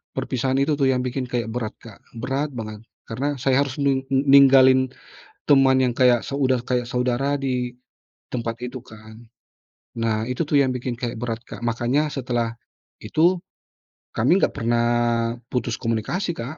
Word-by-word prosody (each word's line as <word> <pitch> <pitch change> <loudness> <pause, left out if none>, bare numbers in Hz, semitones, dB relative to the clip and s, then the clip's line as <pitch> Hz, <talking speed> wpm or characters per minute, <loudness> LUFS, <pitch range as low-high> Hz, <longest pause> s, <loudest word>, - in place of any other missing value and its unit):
perpisahan 130 +1 -1
itu 145 0 0
tuh 135 - +3
yang 130 -1 +1
bikin 125 0 -3
kayak 120 -2 -3
berat 110 -2 -4
Kak, 110 -4 -13 0.2
berat 135 +5 -2
banget 110 -2 -6 0.3
karena 140 +5 -2
saya 135 0 +1
harus 135 -2 -2
nung 140 -2 +1
n 135 0 +1
ninggalin 135 -1 +6 0.6
teman 135 -2 +5
yang 125 - +2
kayak 125 -1 +3
so 140 - -4
udah 130 -2 +2
kayak 125 -1 -1
saudara 125 +3 0
di 125 -3 -2 0.6
tempat 115 -1 -3
itu 125 0 -8
kan. 110 -1 -14 0.8
Nah 110 -1 0
itu 125 +2 -5
tuh 150 - +2
yang 135 -2 +3
bikin 125 -1 -4
kayak 120 -1 -5
berat, 115 -1 -4
Kak. - - -10
Makanya 120 +5 0
setelah 120 -4 -2 0.5
itu 160 +12 +2 0.7
kami 165 - +2
enggak - - 0
pernah 115 +1 +1 0.7
putus 120 -2 -1
komunikasi, 120 - -2
Kak. 135 +4 -7
125 Hz, 160 wpm, -23 LUFS, 120-135 Hz, 0.8 s, ninggalin